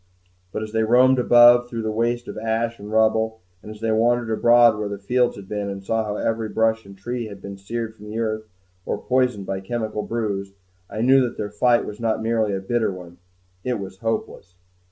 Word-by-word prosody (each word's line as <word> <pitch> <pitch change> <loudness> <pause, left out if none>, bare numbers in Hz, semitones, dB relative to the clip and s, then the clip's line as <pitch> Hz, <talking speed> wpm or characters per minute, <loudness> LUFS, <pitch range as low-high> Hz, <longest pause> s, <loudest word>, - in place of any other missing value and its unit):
But 110 - -3
as 110 - -7
they 110 0 +1
roamed 125 +3 +4
above 120 0 +6
through 115 -2 -4
the 110 - -1
waste 120 +2 -1
of - - -7
ash 115 +1 -2
and 105 +1 -9
rubble, 110 0 +2 0.2
and - - -11
as 110 0 -10
they 115 0 0
wandered 115 +1 +2
abroad 120 0 +5
where 105 -1 -2
the 100 - -4
fields 120 +5 +1
had 100 -1 -11
been 105 -1 -3
and 100 0 -6
saw 110 +3 0
how 105 -1 -3
every 110 0 -1
brush 110 -1 0
and 100 0 -13
tree 120 +4 -4
had 100 -2 -10
been 100 0 -8
seared 110 +3 -5
from 105 -1 -13
the 110 - -5
earth 110 -1 -2 0.4
or - - -2
poisoned 125 -6 0
by 95 0 -3
chemical 110 +1 -3
brews, 100 -4 -3 0.4
I 110 - -4
knew 130 +3 +5
that 125 -2 -2
their 105 -1 -4
fight 120 +3 +2
was 105 - -8
not 115 -1 0
merely 110 -3 +1
a - - -2
bitter 115 +2 0
one 90 -2 -11 0.4
it 125 -2 -1
was 95 -1 -8
hopeless. 110 -5 -4
110 Hz, 215 wpm, -22 LUFS, 105-120 Hz, 0.4 s, above